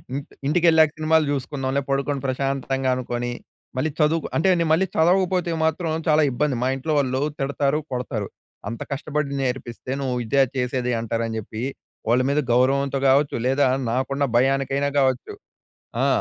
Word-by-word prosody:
ఇంట్ 140 0 -6 0.2
ఇంటికెళ్ళాక 160 -1 +4
సినిమాలు 155 0 +3
చూసుకుందాం‌లే 135 0 -2
పడుకొని 140 0 0
ప్రశాంతంగా 135 0 -1
అనుకోని, 120 -1 -3 0.5
మళ్ళీ 155 +4 0
చదువు‌కు 155 +1 +2
అంటే 160 - +2
నేను 170 -2 +1
మళ్ళీ 190 +4 +2
చదవకపోతే 180 +1 +2
మాత్రం 160 +1 0 0.2
చాలా 155 0 +4
ఇబ్బంది. 135 0 0
మా 130 - +2
ఇంట్లో 155 +4 -2
వాళ్ళు 130 -1 0 0.2
తిడతారు, 140 +1 0
కొడతారు. 125 -5 -3 0.4
అంత 115 - -6
కష్టపడి 145 0 -2
నేర్పిస్తే 125 -1 -4
నువ్వు 130 -2 -1
ఇదా 135 +4 +4
చేసేది 125 0 -1
అంటారు 115 0 -2
అని 110 0 -4
చెప్పి, 110 +2 -6 0.5
వాళ్ళ 120 +2 +4
మీద 140 +2 +2
గౌరవంతో 135 +2 +2
కావచ్చు 140 +2 +3
లేదా 135 +1 +3 0.2
నాకున్న 130 +3 -1
భయానికైనా 135 +2 +1
కావచ్చు 130 - 0 0.7
ఆ! - - +3
135 Hz, 145 wpm, -23 LUFS, 130-150 Hz, 0.7 s, ఇంటికెళ్ళాక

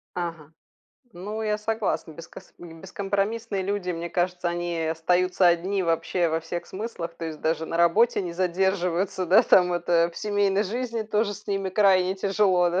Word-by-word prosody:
Ага. 165 -3 -5 0.6
Ну, 210 +5 -5
я 210 -1 0
согласна. 210 -7 -2
Бескос 165 +2 -13
м, 165 -2 -11
бескомпромиссные 200 +2 -2
люди, 195 -1 -2
мне 170 0 -4
кажется, 180 0 -1
они 175 -1 -3
остаются 180 +3 +2
одни 180 +3 +2
вообще 165 0 0
во 160 +1 0
всех 170 +1 -5
смыслах. 185 -5 -6
То 170 0 -6
есть 155 -2 -7
даже 160 0 0
на 165 - -3
работе 170 +7 +3
не 175 -2 -5
задерживаются, 185 0 0
да, 195 +8 +6
там, 180 -5 +4
это, 170 0 +2
в - - -18
семейной 205 -1 +1
жизни 230 +2 -3
тоже 210 -1 -1
с 210 +2 -14
ними 195 -1 -1
крайне 190 -1 +3
тяжело, 190 -2 +2
да? 180 +2 0
185 Hz, 170 wpm, -25 LUFS, 170-200 Hz, 0.6 s, да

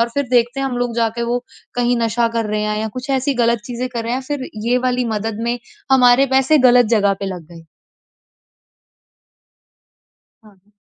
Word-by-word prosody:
और 230 - +2
फिर 280 -3 -1
देखते 245 +2 +2
हैं 270 - 0
हम 250 - -3
लोग 245 -1 -2
जाके 230 0 0
वो 245 0 -2 0.3
कहीं 245 0 +1
नशा 230 +1 +1
कर 225 - 0
रहे 210 0 -2
हैं 210 0 -1
या 220 - -2
कुछ 265 +2 -6
ऐसी 270 +2 -1
ग़लत 235 -1 +2
चीज़ें 250 +1 -4
कर 235 -2 -5
रहे 235 - -2
हैं 260 - -2
फिर 285 -3 -3 0.2
ये 250 +1 +3
वाली 250 0 0
मदद 215 0 -3
में 240 +1 -1 0.3
हमारे 250 +1 +5
पैसे 270 +4 +4
ग़लत 245 -1 +5
जगह 200 -1 +2
पे 200 - -3
लग 180 -4 -6
गए। 165 -1 -13 2.8
हाँ। 205 -2 -23
240 Hz, 190 wpm, -18 LUFS, 220-250 Hz, 2.8 s, हमारे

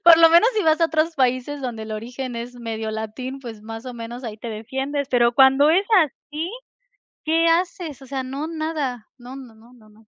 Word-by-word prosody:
Por 335 -1 +10
lo 330 0 +8
menos 340 +8 +6
si 425 - +2
vas 315 +1 +3
a 330 - +5
otros 320 +1 0
países 255 +2 0
donde 240 -4 -4
el 220 0 -6
origen 245 +3 -5
es 240 +1 -6
medio 225 -2 -4
latín, 220 +5 -5
pues 230 -5 -9
más 225 +2 -8
o 250 - -5
menos 235 +2 -7
ahí 215 -2 -5
te 235 - -7
defiendes, 265 +6 -3
pero 240 -1 +3
cuando 270 +2 +6
es 380 +5 +3 0.2
así, 305 +3 -6 0.8
¿qué 325 +1 +3
haces? 335 -4 0
O - - -11
sea, 265 0 -3
no 275 +4 -4
nada, 310 -7 -3
no 250 +1 -10
no 255 -5 -11
no 230 +3 -19
no 220 -3 -20
no. 215 +1 -22
260 Hz, 215 wpm, -22 LUFS, 230-310 Hz, 0.8 s, Por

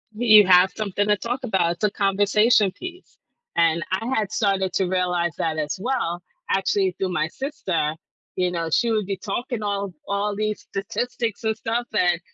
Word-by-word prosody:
You 215 -2 +7
have 180 0 +6
something 205 -1 -1
to 210 0 +3
talk 245 +5 -4
about, 180 -5 +1
it's 175 - -14
a 210 - +4
conversation 205 +1 +3
piece, 360 - -10 0.4
and 170 -1 +2
I 190 +4 -1
had 215 -3 -1
started 195 -3 +1
to 190 - +1
realize 180 -2 0
that 160 -1 -1
as 150 -1 -2
well, 215 -8 -1 0.3
actually, 195 -1 +1
through 190 - -1
my 155 -3 0
sister, 195 - -2 0.4
you 180 -1 0
know, 165 -2 -2
she 230 +8 +2
would 215 -2 0
be 195 -1 -2
talking 230 +3 -4
all 200 -1 -2 0.2
all 200 +1 -1
these 215 0 -2
statistics 225 +3 -3
and 220 0 0
stuff 230 +2 -2
and 175 -3 +3
200 Hz, 175 wpm, -23 LUFS, 180-220 Hz, 0.4 s, You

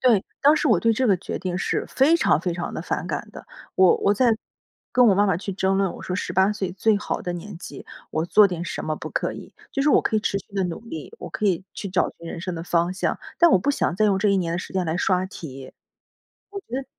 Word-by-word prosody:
对。 235 -7 +4 0.2
当 290 +2 +6
时 295 - +1
我 220 - +5
对 230 0 +3
这 255 +3 +1
个 195 - +4
决 180 - -5
定 180 -1 -3
是 - - -1
非 290 +5 +4
常 155 - +3
非 180 0 -1
常 175 - -4
地 - - -3
反 - - -3
感 - - -4
的。 - - -11 0.3
我 185 -2 +5
我 200 - +2
在 230 0 +3 0.6
跟 250 -1 +5
我 200 - +5
妈 205 +2 +3
妈 190 -5 +2
去 195 +2 -5
争 190 0 +1
论， 195 -2 +1
我 - - -10
说 180 - -3
18 190 +2 +1
岁 195 -4 -3
最 210 +3 +2
好 205 - -3
的 175 - -3
年 175 +2 -7
纪 - - -9 0.3
我 160 +1 -1
做 210 +4 +6
点 175 -2 -4
什 170 - -4
么 155 0 -2
不 - - -7
可 - - -1
以。 - - -10 0.2
就 275 - 0
是 295 - +3
我 - - +5
可 220 - 0
以 - - +2
持 200 - -1
续 - - -12
地 195 -1 +1
努 175 +2 -4
力， 280 - -8
我 - - -7
可 - - -4
以 185 -1 +1
去 200 - -5
找 180 -1 +1
寻 170 - -10
人 165 - -6
生 180 0 -4
的 165 - -5
方 175 +1 +1
向。 185 - -1 0.2
但 340 -1 +6
我 - - +5
不 195 - 0
想 280 - 0
再 215 - +3
用 195 -2 +3
这 210 - +2
一 200 - +3
年 170 -3 -1
的 170 - -1
时 - - -7
间 190 -1 0
来 160 - -1
刷 185 0 +1
题。 135 -8 -9 0.8
我 400 - -5
觉 - - -49
得 270 - -3
190 Hz, 295 characters per minute, -24 LUFS, 175-215 Hz, 0.8 s, 当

